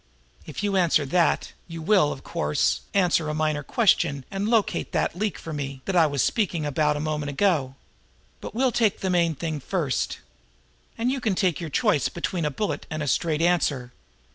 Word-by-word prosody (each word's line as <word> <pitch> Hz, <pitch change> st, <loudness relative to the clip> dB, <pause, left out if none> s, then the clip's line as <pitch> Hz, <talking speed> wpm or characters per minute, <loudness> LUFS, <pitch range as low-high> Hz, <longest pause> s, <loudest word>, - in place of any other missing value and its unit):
If -, -, -6 dB
you 200 Hz, -1 st, +1 dB
answer 165 Hz, -5 st, +3 dB
that, 170 Hz, +5 st, +1 dB
you 165 Hz, -1 st, -7 dB
will, 165 Hz, -2 st, +3 dB
of 135 Hz, -, -7 dB
course, 160 Hz, -3 st, 0 dB
answer 175 Hz, -5 st, +2 dB
a 150 Hz, -, -2 dB
minor 155 Hz, -1 st, 0 dB
question 150 Hz, -, +2 dB
and 200 Hz, +2 st, -2 dB
locate 225 Hz, -3 st, +1 dB
that -, -, 0 dB
'leak', 210 Hz, +2 st, -2 dB
for 165 Hz, -, -7 dB
me, 140 Hz, -2 st, -5 dB
that 195 Hz, -, -2 dB
I 165 Hz, -3 st, +6 dB
was 140 Hz, -3 st, 0 dB
speaking 175 Hz, -8 st, 0 dB
about 150 Hz, +1 st, +1 dB
a -, -, -3 dB
moment 150 Hz, -1 st, -2 dB
ago. 145 Hz, -4 st, +1 dB, 0.6 s
But -, -, -8 dB
we'll 255 Hz, +1 st, +2 dB
take 225 Hz, -4 st, +1 dB
the 190 Hz, -, 0 dB
main 170 Hz, -2 st, +2 dB
thing 155 Hz, +1 st, -3 dB
first. 150 Hz, -2 st, -2 dB, 0.8 s
And 240 Hz, +3 st, 0 dB
you 270 Hz, -1 st, -2 dB
can 215 Hz, -6 st, 0 dB
take 185 Hz, -5 st, +1 dB
your 165 Hz, -2 st, -5 dB
choice 140 Hz, 0 st, +2 dB
between 170 Hz, -1 st, -3 dB
a -, -, +1 dB
bullet 210 Hz, +8 st, -3 dB
and 155 Hz, -1 st, -3 dB
a -, -, -4 dB
straight 160 Hz, +2 st, +1 dB
answer. 145 Hz, -8 st, +1 dB
165 Hz, 190 wpm, -25 LUFS, 150-195 Hz, 0.8 s, I